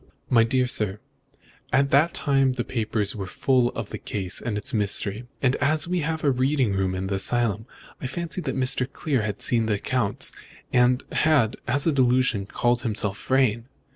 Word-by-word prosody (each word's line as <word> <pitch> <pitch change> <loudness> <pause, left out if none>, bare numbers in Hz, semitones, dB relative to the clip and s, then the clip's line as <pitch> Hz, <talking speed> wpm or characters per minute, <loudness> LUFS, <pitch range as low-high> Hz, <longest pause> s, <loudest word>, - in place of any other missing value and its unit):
"My 115 -3 +6
dear 125 +2 +1
sir, 105 -5 -1 0.7
at 135 +2 +2
that 150 +5 +3
time 135 -2 +2
the 125 -1 -3
papers 110 -4 -2
were 95 -3 -5
full 125 +4 +1
of 115 -3 -5
the - - -5
case 95 -3 -1
and 110 -4 -3
its 105 +6 0
mystery, 105 +2 +1 0.2
and 130 0 +3
as 155 +2 +2
we 180 0 0
have 160 0 -3
a 145 - +3
reading 130 -3 +1
room 95 -1 -1
in 95 +1 -3
this 95 0 -1
asylum, 115 -2 0 0.3
I 130 - -3
fancied 170 +5 -3
that 130 -1 +1
Clear 140 -7 -1
had 105 -1 -3
seen 115 -2 +2
the 105 - +1
accounts, 110 0 -2 0.4
and 125 +1 +3
had, 145 -8 +2
as 145 +1 +1
a 165 - +3
delusion, 125 -6 +2
called 120 +2 0
himself 105 -4 -2
Vrain. 125 -4 +2
125 Hz, 180 wpm, -24 LUFS, 105-135 Hz, 0.7 s, My